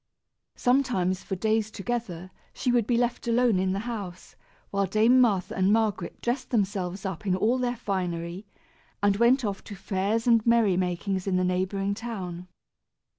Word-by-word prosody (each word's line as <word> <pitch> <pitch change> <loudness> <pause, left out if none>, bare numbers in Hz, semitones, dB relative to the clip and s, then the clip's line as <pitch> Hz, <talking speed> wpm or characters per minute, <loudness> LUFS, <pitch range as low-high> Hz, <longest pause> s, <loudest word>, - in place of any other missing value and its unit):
Sometimes, 240 -8 +1
for 190 - -4
days 215 +2 0
together, 200 -5 -4 0.2
she 250 - -1
would 235 -3 +2
be 240 - +2
left 240 0 -1
alone 235 -4 +3
in 185 0 +1
the 195 - -1
house, 205 -6 -7 0.4
while 200 -1 0
Dame 225 +6 +4
Martha 200 -7 +1
and 190 +1 +2
Margaret 210 -5 0
dressed 245 +2 -2
themselves 195 -4 -1
up 190 +1 -5
in 185 - +2
all 220 +7 +1
their 245 -1 -1
finery, 180 -3 -3 0.6
and 205 -1 +4
went 240 +3 +4
off 200 -2 -3
to 205 - -8
fairs 200 +3 -1
and 230 -3 +4
merrymakings 190 -4 +1
in 190 - +1
the 185 - +2
neighboring 190 +2 0
town. 185 -6 -6
200 Hz, 160 wpm, -27 LUFS, 185-235 Hz, 0.6 s, Dame